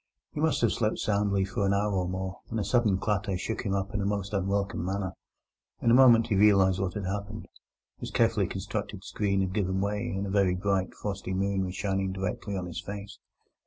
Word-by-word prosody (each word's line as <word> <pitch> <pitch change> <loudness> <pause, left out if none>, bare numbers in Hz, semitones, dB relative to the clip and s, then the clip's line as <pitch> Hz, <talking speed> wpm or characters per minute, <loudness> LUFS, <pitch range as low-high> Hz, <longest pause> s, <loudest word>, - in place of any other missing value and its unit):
He - - -6
must 160 -4 +2
have 115 - +3
slept 110 -2 0
soundly 100 -2 +1
for 100 +2 -2
an 100 0 +2
hour 105 +1 +1
or 90 -2 0
more, 95 0 -4
when 115 - -4
a 105 - 0
sudden 110 -6 +2
clatter 105 -2 -1
shook 110 +5 -3
him 100 -2 -1
up 100 0 -2
in 100 - -1
a - - -1
most 100 0 -2
unwelcome 100 -1 -1
manner. 95 0 -2 0.7
In 115 - +2
a - - +6
moment 120 -3 +7
he 105 - +2
realized 95 -2 +5
what 95 -2 -2
had 105 -2 -3
happened: 100 +3 -4 0.5
his - - -5
carefully - - +2
constructed - - -5
screen 100 -2 0
had 95 -1 -1
given 95 -2 0
way, 105 +1 -1
and 100 - -2
a 95 - -4
very 95 -2 +3
bright 95 0 -1
frosty 100 -2 -4
moon 95 0 0
was 90 0 -5
shining 95 -1 -1
directly 95 +1 -3
on 90 - -3
his 85 - -5
face. 100 -1 -8
100 Hz, 215 wpm, -28 LUFS, 95-105 Hz, 0.7 s, moment